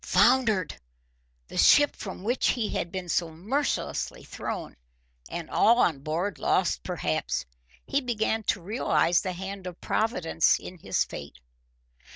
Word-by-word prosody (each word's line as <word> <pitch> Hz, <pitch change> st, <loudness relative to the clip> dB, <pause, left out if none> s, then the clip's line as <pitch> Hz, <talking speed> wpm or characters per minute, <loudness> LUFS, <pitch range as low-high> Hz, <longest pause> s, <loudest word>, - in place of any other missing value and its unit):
Foundered! 215 Hz, -, +3 dB, 0.7 s
The -, -, -4 dB
ship 290 Hz, -1 st, +6 dB
from 190 Hz, -2 st, -7 dB
which 240 Hz, +5 st, +1 dB
he 230 Hz, -4 st, +1 dB
had 170 Hz, -, -3 dB
been 185 Hz, -2 st, -5 dB
so 170 Hz, 0 st, 0 dB
mercilessly 215 Hz, -, -2 dB
thrown! -, -, -5 dB, 0.5 s
And -, -, -5 dB
all 235 Hz, +2 st, +4 dB
on 165 Hz, -, +2 dB
board 160 Hz, +4 st, -2 dB
lost, 60 Hz, -, +1 dB
perhaps. -, -, -2 dB, 0.4 s
He 280 Hz, -, 0 dB
began 225 Hz, -3 st, 0 dB
to 190 Hz, -, 0 dB
realise 180 Hz, -4 st, +2 dB
the 185 Hz, -2 st, -3 dB
hand 190 Hz, +1 st, -6 dB
of 180 Hz, -1 st, -8 dB
Providence 180 Hz, -8 st, +1 dB
in 180 Hz, -1 st, -10 dB
his -, -, +1 dB
fate. 70 Hz, -2 st, -9 dB
190 Hz, 140 wpm, -27 LUFS, 170-225 Hz, 0.7 s, ship